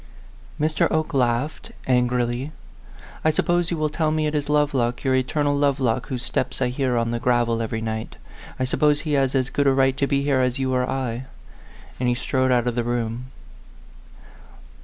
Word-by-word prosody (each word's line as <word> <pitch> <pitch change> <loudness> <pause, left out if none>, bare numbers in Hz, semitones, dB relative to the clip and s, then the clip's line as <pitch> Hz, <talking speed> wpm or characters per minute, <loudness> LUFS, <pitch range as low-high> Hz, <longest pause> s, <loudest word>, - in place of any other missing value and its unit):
Mr. 155 +1 +2
Oke 155 -1 -1
laughed, 125 +2 -1
angrily. 125 +1 +1 0.7
"I 155 - +4
suppose 175 +2 +1
you 170 - -1
will 155 -1 0
tell 155 0 0
me 155 0 0
it 150 - -1
is 145 -1 -1
Lovelock 140 -5 +1
your 130 - +2
eter 130 +3 +1
nal 145 0 +2
Lovelock 135 -4 +1
whose 125 -3 -4
steps 130 - -2
I 125 -2 +1
hear 125 -1 0
on 115 0 0
the 120 - -1
gravel 120 -1 +1
every 115 0 -3
night. 110 0 -4 0.4
I - - -1
suppose 145 +3 +2
he 155 -1 -2
has 135 -1 +2
as 130 0 0
good 145 -1 +1
a - - +6
right 135 0 +3
to 140 - +1
be 140 -1 +1
here 140 -2 +2
as 125 0 +1
you 130 -1 -1
or 125 0 0
I." 130 -2 -3 0.7
And 125 -1 +1
he 120 - +2
strode 130 +1 0
out 120 -1 +3
of 120 - 0
the 120 0 -1
room. 120 +1 -2
130 Hz, 195 wpm, -23 LUFS, 120-145 Hz, 0.7 s, a